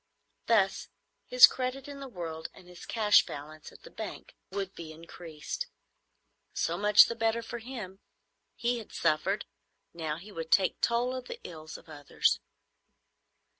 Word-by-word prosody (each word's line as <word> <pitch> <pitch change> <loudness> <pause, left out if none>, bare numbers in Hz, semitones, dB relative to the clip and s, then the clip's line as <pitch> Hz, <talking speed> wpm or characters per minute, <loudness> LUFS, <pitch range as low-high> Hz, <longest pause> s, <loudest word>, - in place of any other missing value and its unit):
Thus 200 -4 +2 0.4
his - - +10
credit 260 +1 -3
in 285 -1 -8
the 275 - -7
world 165 -8 -6
and 180 - -15
his 180 -1 -12
cash 215 -2 +5
balance 150 +2 -9
at - - -17
the - - -12
bank - - -7 0.2
would 195 -1 -3
be 165 -2 -8
increased. 165 - -7 0.9
So 170 - 0
much 210 +2 +7
the - - -3
better 225 0 0
for 235 +1 -6
him. 220 -6 -7 0.6
He 240 0 0
had 220 - -11
suffered. 170 +5 +1 0.5
Now 155 -2 -3
he 195 +5 -12
would 165 -4 -6
take 190 -2 +3
toll 240 +2 +1
of 255 -1 -6
the - - -7
ills 155 -2 -9
of 170 - -18
others. 145 -3 0
195 Hz, 155 wpm, -30 LUFS, 165-235 Hz, 0.9 s, his